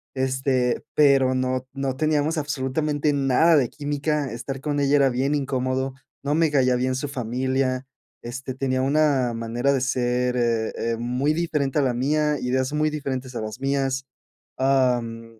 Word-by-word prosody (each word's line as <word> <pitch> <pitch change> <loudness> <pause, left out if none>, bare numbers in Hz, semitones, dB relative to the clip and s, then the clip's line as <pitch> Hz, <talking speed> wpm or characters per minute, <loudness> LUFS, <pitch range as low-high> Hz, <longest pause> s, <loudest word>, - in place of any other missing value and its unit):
Este, 130 -1 0
pero 135 -3 +4
no 130 0 -1
no 135 -1 -2
teníamos 155 +1 +1
absolutamente 145 +1 -1
nada 140 +4 +4
de 130 -4 +2
química. 145 -2 -2
Estar 130 +3 -5
con 145 -1 -1
ella 140 0 +3
era 140 -1 +4
bien 135 +4 0
incómodo. 130 -1 -1 0.3
No 140 +1 0
me 160 -1 +3
caía 130 -3 +3
bien 130 +1 0
su 140 +3 -3
familia. 130 +1 -1 0.4
Este, 125 +2 -6
tenía 130 -1 0
una 140 -3 +2
manera 115 +4 0
de 135 - 0
ser, 125 -1 0
eh 115 -2 0
eh, 115 0 -1
muy 125 +5 0
diferente 155 -4 -1
a - - +2
la 130 -2 +1
mía. 150 +3 +1
Ideas 130 +2 -1
muy 155 0 +2
diferentes 130 -4 -4
a - - -2
las 110 +2 -6
mías. 135 -1 0 0.5
Am, 120 -4 0
130 Hz, 160 wpm, -24 LUFS, 125-145 Hz, 0.5 s, pero